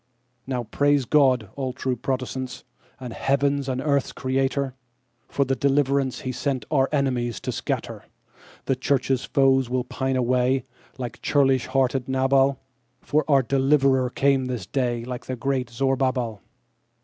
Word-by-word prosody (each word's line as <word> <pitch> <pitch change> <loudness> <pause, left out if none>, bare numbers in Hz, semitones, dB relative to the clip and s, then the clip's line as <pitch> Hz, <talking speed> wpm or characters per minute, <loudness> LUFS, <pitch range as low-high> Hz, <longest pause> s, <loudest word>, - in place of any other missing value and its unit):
Now, 125 -2 -2
praise 145 +4 +1
God, 130 -6 +3
all 130 -2 -3
true 130 -1 -2
Protestants, 130 +1 -4 0.4
and 125 -3 -7
heaven's 140 0 0
and 130 -1 -1
earth's 140 -1 0
Creator, 135 +1 -1 0.5
For 140 - 0
the 135 0 0
deliverance 140 -1 +1
he 130 - -3
sent 130 -2 -2
our 135 -3 +3
enemies 125 -5 0
to - - -3
scatter. - - -4 0.6
The 135 - +1
Church's 130 0 0
foes 135 -2 +3
will 125 0 0
pine 130 +1 -2
away, 125 +1 +1 0.3
like 125 -3 -6
churlish 135 -3 +2
hearted 130 -1 0
Nabal, 135 +1 +2 0.4
For 150 +5 +1
our 135 -2 +5
deliverer 135 0 +3
came 135 +1 +2
this 125 -7 -4
day 120 -1 -1
like 125 -1 -6
the 130 - -3
great 130 0 -1
Zorobabal. 130 -3 0
130 Hz, 140 wpm, -24 LUFS, 125-135 Hz, 0.6 s, our